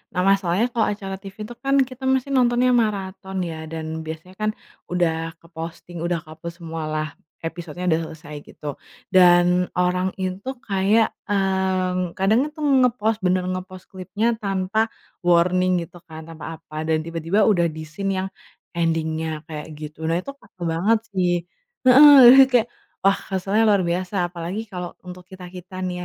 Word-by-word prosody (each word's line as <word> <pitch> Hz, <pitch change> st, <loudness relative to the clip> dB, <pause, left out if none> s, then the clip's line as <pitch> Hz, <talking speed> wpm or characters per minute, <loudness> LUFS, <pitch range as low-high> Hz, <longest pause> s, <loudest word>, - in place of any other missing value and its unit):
nah -, -, 0 dB
masalahnya 195 Hz, +2 st, +2 dB
kalau 230 Hz, -2 st, +1 dB
acara 195 Hz, -2 st, -5 dB
TV 195 Hz, -1 st, -11 dB
itu 240 Hz, -, -10 dB
kan 275 Hz, 0 st, +2 dB
kita 260 Hz, 0 st, -11 dB
mesti 265 Hz, 0 st, +2 dB
nontonnya 250 Hz, -1 st, +3 dB
maraton 190 Hz, -4 st, -2 dB
ya 160 Hz, 0 st, -7 dB
dan 160 Hz, 0 st, -5 dB
biasanya 160 Hz, +4 st, -8 dB
kan, 215 Hz, 0 st, +1 dB, 0.4 s
udah 165 Hz, -2 st, 0 dB
ke-posting 165 Hz, +1 st, -8 dB
udah 170 Hz, 0 st, 0 dB
ke-upload 160 Hz, +2 st, -9 dB
semua 165 Hz, -1 st, -5 dB
lah, 155 Hz, 0 st, -1 dB, 0.4 s
episodenya 170 Hz, +1 st, -5 dB
udah 160 Hz, -, +3 dB, 0.2 s
selesai 150 Hz, -1 st, -11 dB
gitu 145 Hz, -2 st, -7 dB, 0.4 s
dan 180 Hz, 0 st, +5 dB
orang 180 Hz, +1 st, +1 dB
itu 185 Hz, +5 st, -3 dB
kayak, 200 Hz, +3 st, +3 dB, 0.2 s
mmm, 190 Hz, -3 st, 0 dB
kadang 220 Hz, +9 st, +3 dB
itu 300 Hz, +1 st, -13 dB, 0.2 s
nge-post 225 Hz, -3 st, +1 dB
bener 185 Hz, 0 st, +2 dB
nge-post 185 Hz, 0 st, -6 dB
klipnya 210 Hz, +5 st, -1 dB
tanpa 195 Hz, +1 st, 0 dB, 0.4 s
warning 180 Hz, +1 st, +3 dB
gitu 175 Hz, -, -15 dB
kan 160 Hz, 0 st, -9 dB
tanpa 165 Hz, 0 st, -8 dB
apa, 155 Hz, 0 st, -6 dB
dan 160 Hz, -1 st, +2 dB
tiba-tiba 165 Hz, +5 st, 0 dB
udah 175 Hz, -6 st, +3 dB
di 155 Hz, -1 st, -7 dB
scene 195 Hz, +6 st, -3 dB
yang, 190 Hz, -, -4 dB, 0.5 s
ending-nya 160 Hz, -1 st, -1 dB
kayak 155 Hz, 0 st, -7 dB
gitu 155 Hz, +1 st, -8 dB
nah 165 Hz, -, +1 dB
itu 275 Hz, -, -9 dB
parah 185 Hz, -, -23 dB
banget 175 Hz, +7 st, +2 dB
sih 180 Hz, -3 st, +1 dB, 0.5 s
heeh, 290 Hz, +3 st, +9 dB, 0.2 s
jadi 270 Hz, -, +10 dB
kayak 240 Hz, -2 st, +4 dB, 0.3 s
wah 195 Hz, 0 st, +4 dB
keselnya 195 Hz, +4 st, 0 dB
luar 205 Hz, -3 st, +4 dB
biasa 180 Hz, +1 st, -1 dB
apalagi 180 Hz, +6 st, -5 dB
kalau 180 Hz, -2 st, -6 dB
untuk 180 Hz, 0 st, -10 dB
kita 185 Hz, -1 st, -11 dB
kita 185 Hz, +1 st, -9 dB
nih 180 Hz, -1 st, -3 dB
185 Hz, 160 wpm, -22 LUFS, 165-200 Hz, 0.5 s, jadi